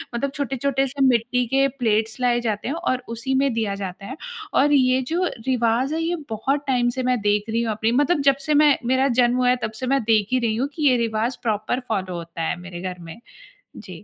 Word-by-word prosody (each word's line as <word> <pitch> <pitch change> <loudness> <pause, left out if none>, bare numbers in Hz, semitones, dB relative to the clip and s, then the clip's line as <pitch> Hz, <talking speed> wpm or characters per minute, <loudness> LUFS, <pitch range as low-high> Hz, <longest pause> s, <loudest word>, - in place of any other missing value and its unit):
मतलब 270 +3 -1
छोटे-छोटे 275 -1 -1
से 275 +2 -5
मिट्टी 250 0 +2
के 270 +3 +3
प्लेट्स 220 0 0
लाए 240 -1 +2
जाते 215 -1 -2
हैं 280 - -1
और 255 -7 -2
उसी 235 +4 -3
में 275 -2 +2
दिया 220 -3 -1
जाता 195 -1 -7
है। 260 +6 -6 0.4
और 290 +2 +3
ये 260 -1 +4
जो 355 +2 +1 0.2
रिवाज़ 250 +2 +1
है 325 - -1
ये 345 +1 0
बहुत 270 +7 -1
टाइम 245 -2 +2
से 255 - -1
मैं 250 -1 +1
देख 210 +1 0
रही 230 +1 0
हूँ 225 - -1
अपनी 220 +2 0
मतलब 290 +4 +2
जबसे 275 +2 0
मैं 295 -2 +5
मेरा 260 +2 +2
जन्म 240 0 +3
हुआ 250 0 +3
है 250 - +4
तब 220 - -2
से 255 - -2
मैं 275 0 +2
देख 215 -2 +2
ही 255 - +3
रही 230 -3 0
हूँ 260 +5 0
कि 300 -3 +1
ये 250 - +3
रिवाज़ 230 +1 -1
प्रॉपर 215 +2 -1
फॉलो 190 -4 -2
होता 170 0 -7
है 165 - -1
मेरे 175 -1 -8
घर 185 -1 -5
में। 165 +3 -10 0.6
जी। - - -10
245 Hz, 230 wpm, -22 LUFS, 220-270 Hz, 0.6 s, मैं